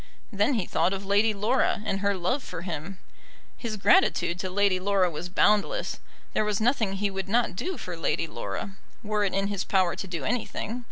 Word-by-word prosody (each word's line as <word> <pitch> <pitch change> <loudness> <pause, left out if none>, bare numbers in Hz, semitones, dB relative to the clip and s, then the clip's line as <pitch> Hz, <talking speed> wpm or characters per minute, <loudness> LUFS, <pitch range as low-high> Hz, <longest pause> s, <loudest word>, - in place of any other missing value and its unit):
Then 210 +6 +2
he 210 -6 0
thought 175 +2 +1
of 195 0 -4
Lady 205 +3 +3
Laura, 215 +1 +1
and 195 - -1
her 200 0 +1
love 185 +11 0
for 165 - -7
him. 175 +1 -5 0.6
His 225 -3 -4
gratitude 200 - +3
to 185 - -2
Lady 195 0 +2
Laura 190 -2 +2
was 165 +3 -5
boundless. 210 - +2 0.3
There - - +2
was 210 -1 0
nothing 225 -3 +2
he 200 +1 -1
would 195 0 -4
not 230 -2 +2
do 360 - -3
for 180 - -6
Lady 165 0 0
Laura, 150 - -5 0.3
were 210 -1 0
it 190 - -1
in 195 0 +1
his 200 -1 -2
power 185 -3 +2
to 195 - -5
do 175 -3 -4
anything. 235 0 -2
200 Hz, 200 wpm, -27 LUFS, 185-215 Hz, 0.6 s, Lady